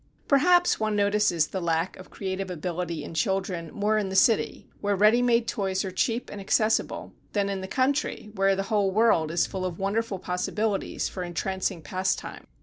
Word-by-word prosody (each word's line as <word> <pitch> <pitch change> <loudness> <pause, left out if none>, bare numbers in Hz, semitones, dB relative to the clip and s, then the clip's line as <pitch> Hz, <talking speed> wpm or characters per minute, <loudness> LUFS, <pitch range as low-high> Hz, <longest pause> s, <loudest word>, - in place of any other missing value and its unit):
Perhaps 350 +6 +4
one 215 -1 0
notices 205 -5 +2
the 190 - -5
lack 165 +1 0
of 185 - -12
creative 190 -1 -4
ability 170 -2 -3
in - - -8
children 180 0 -1
more 215 +1 +1
in 200 -2 -2
the 190 - -4
city 220 +3 +2
where 205 0 0
ready 215 +5 +5
made 235 -1 +2
toys 195 -1 -1
are 190 - -4
cheap 230 +6 -1
and 205 - -7
accessible, 215 +3 0 0.2
than 200 -1 +1
in 195 -1 -3
the 190 - -5
country 260 -2 -1
where 195 -1 +2
the 195 - -1
whole 205 -2 +3
world 190 -6 +3
is 170 +1 +1
full 190 -2 -5
of 180 -2 -3
wonderful 205 +1 -1
possibilities 195 +3 -2
for 185 - -6
entrancing 180 0 -2
pastime. 185 +3 -3
195 Hz, 180 wpm, -26 LUFS, 185-215 Hz, 0.2 s, ready